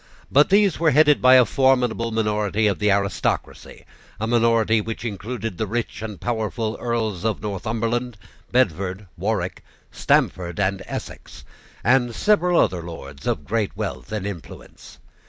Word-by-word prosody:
But 145 Hz, +2 st, +5 dB
these 200 Hz, -2 st, +3 dB
were 165 Hz, -1 st, +4 dB
headed 150 Hz, 0 st, +4 dB
by 130 Hz, 0 st, +7 dB
a 125 Hz, -1 st, +7 dB
formidable 125 Hz, -4 st, +2 dB
minority 105 Hz, -1 st, 0 dB
of 100 Hz, -2 st, +1 dB
the 105 Hz, 0 st, +2 dB
aristocracy, 100 Hz, 0 st, -2 dB, 0.3 s
a 110 Hz, -, -1 dB
minority 115 Hz, -1 st, +3 dB
which 115 Hz, +1 st, -6 dB
included 110 Hz, -1 st, -5 dB
the 110 Hz, -, -1 dB
rich 115 Hz, +1 st, -3 dB
and 110 Hz, -3 st, -6 dB
powerful 110 Hz, -1 st, -2 dB
Earls 110 Hz, -6 st, -2 dB
of 110 Hz, -2 st, -1 dB
Northumberland, 115 Hz, +4 st, -3 dB, 0.3 s
Bedford, 100 Hz, -4 st, 0 dB
Warwick, 95 Hz, 0 st, -2 dB, 0.3 s
Stamford, 85 Hz, -1 st, 0 dB
and 95 Hz, -1 st, 0 dB
Essex, -, -, -8 dB, 0.4 s
and 120 Hz, 0 st, +2 dB
several 180 Hz, -5 st, +3 dB
other 90 Hz, -2 st, +1 dB
Lords 70 Hz, -5 st, -9 dB
of 75 Hz, -, -1 dB
great 105 Hz, 0 st, -2 dB
wealth 105 Hz, -1 st, -5 dB
and 105 Hz, -3 st, -3 dB
influence. 100 Hz, -6 st, -9 dB
110 Hz, 140 wpm, -22 LUFS, 100-120 Hz, 0.4 s, by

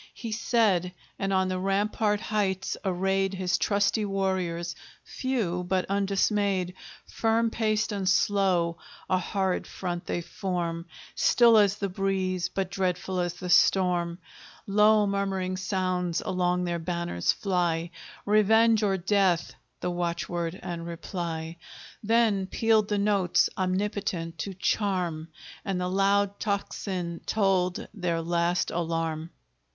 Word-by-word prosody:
He 230 Hz, -2 st, -6 dB
said, 215 Hz, -6 st, +1 dB, 0.3 s
and 195 Hz, -1 st, -1 dB
on 190 Hz, -1 st, +2 dB
the 185 Hz, 0 st, -2 dB
rampart 205 Hz, +2 st, +1 dB
heights 195 Hz, -3 st, -1 dB
arrayed 195 Hz, 0 st, 0 dB
His 185 Hz, -1 st, 0 dB
trusty 205 Hz, +1 st, +1 dB
warriors, 185 Hz, -4 st, -1 dB, 0.3 s
few 215 Hz, -10 st, -2 dB
but 185 Hz, +1 st, 0 dB
undismayed; 195 Hz, -1 st, +1 dB, 0.3 s
Firm 225 Hz, 0 st, +1 dB
paced 215 Hz, -1 st, 0 dB
and 195 Hz, -2 st, -1 dB
slow, 185 Hz, -3 st, +2 dB, 0.3 s
a 185 Hz, -1 st, +2 dB
horrid 190 Hz, 0 st, -1 dB
front 175 Hz, -2 st, -5 dB
they 175 Hz, -, -1 dB
form, 170 Hz, -1 st, -3 dB, 0.3 s
Still 235 Hz, -2 st, +5 dB
as 205 Hz, -2 st, +5 dB
the 205 Hz, -1 st, -2 dB
breeze, 185 Hz, -1 st, -1 dB
but 190 Hz, 0 st, -3 dB
dreadful 185 Hz, -1 st, -1 dB
as 175 Hz, -1 st, -1 dB
the 180 Hz, 0 st, -4 dB
storm; 175 Hz, -1 st, +3 dB, 0.5 s
Low 210 Hz, +1 st, +4 dB
murmuring 195 Hz, -2 st, -1 dB
sounds 185 Hz, -2 st, -1 dB
along 180 Hz, -1 st, 0 dB
their 175 Hz, -1 st, -2 dB
banners 170 Hz, -, -1 dB
fly, 175 Hz, -3 st, -1 dB, 0.3 s
Revenge, 220 Hz, +2 st, +4 dB
or 195 Hz, -2 st, +1 dB
death 190 Hz, -2 st, +1 dB, 0.3 s
the 180 Hz, -, -1 dB
watchword 175 Hz, 0 st, -2 dB
and 170 Hz, -1 st, -5 dB
reply; 170 Hz, -1 st, -5 dB, 0.4 s
Then 215 Hz, -3 st, +2 dB
pealed 220 Hz, 0 st, +2 dB
the 210 Hz, -, 0 dB
notes, 200 Hz, -3 st, +2 dB
omnipotent 185 Hz, -3 st, -2 dB
to 195 Hz, +2 st, -4 dB
charm, 180 Hz, -5 st, -1 dB, 0.4 s
And 195 Hz, -2 st, -2 dB
the 180 Hz, 0 st, -1 dB
loud 200 Hz, +1 st, +2 dB
tocsin 190 Hz, -4 st, -3 dB
tolled 190 Hz, -4 st, +1 dB
their 175 Hz, -5 st, -2 dB
last 170 Hz, +1 st, 0 dB
alarm! 165 Hz, -1 st, -2 dB
190 Hz, 125 wpm, -27 LUFS, 175-200 Hz, 0.5 s, Still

